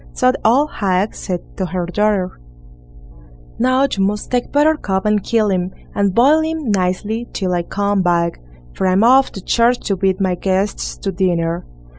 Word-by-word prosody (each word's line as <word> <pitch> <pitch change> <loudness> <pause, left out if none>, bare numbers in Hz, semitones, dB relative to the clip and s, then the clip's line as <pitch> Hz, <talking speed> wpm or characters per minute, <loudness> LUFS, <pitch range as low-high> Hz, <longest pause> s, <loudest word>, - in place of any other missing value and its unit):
So 125 - +3
the - - -6
old 275 +7 +3
hag 195 0 0
said 180 -3 -4 0.2
to 185 - -2
her 180 +1 -3
daughter: 195 0 -1 1.2
"Now 255 +2 +3
you 205 -8 0
must 205 +1 -2
take 245 -1 -1
Buttercup 290 -11 +1
and 210 -1 +2
kill 220 -3 +1
him, 180 -1 -1 0.2
and 200 -2 0
boil 285 +7 +5
him 315 -6 -2
nicely 205 +5 -1
till 185 -2 -2
I 175 - +1
come 200 +3 -1
back, 170 -1 0 0.3
for 190 - -1
I'm 185 +3 +3
off 260 +3 +5
to 195 - -7
church 240 +1 +2
to 195 - -1
bid 190 0 0
my 190 -2 +1
guests 190 +3 -2
to 195 - -3
dinner." 175 -2 -1
195 Hz, 175 wpm, -18 LUFS, 185-230 Hz, 1.2 s, boil